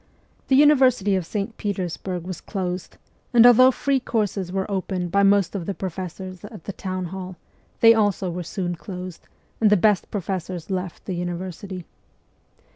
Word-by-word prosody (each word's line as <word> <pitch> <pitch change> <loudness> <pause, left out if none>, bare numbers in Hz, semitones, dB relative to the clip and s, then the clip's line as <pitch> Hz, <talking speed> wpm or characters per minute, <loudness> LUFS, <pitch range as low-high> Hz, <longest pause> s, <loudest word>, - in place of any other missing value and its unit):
The 265 - +4
university 260 -8 +5
of 180 -3 -2
St. 210 +3 -3
Petersburg 185 -3 -3
was 185 0 -6
closed, 180 -3 -4 0.4
and 235 0 +8
although 245 +1 +8
free 275 +1 +1
courses 205 -7 -2
were 190 0 -1
opened 185 -3 -2
by 200 - +3
most 200 -2 +4
of 185 -5 -4
the 200 - -2
professors 185 0 -6
at 205 -5 -10
the 200 - -5
Town 185 -1 -4
Hall, 185 +1 -6 0.5
they 230 0 +9
also 205 -4 +1
were 180 +1 -4
soon 175 +1 -3
closed, 180 -1 -8 0.3
and 220 - +5
the 210 - +5
best 205 0 +2
professors 185 -2 -4
left 185 -2 -4
the 190 - -3
university. 180 +1 -5
190 Hz, 160 wpm, -23 LUFS, 180-210 Hz, 0.5 s, they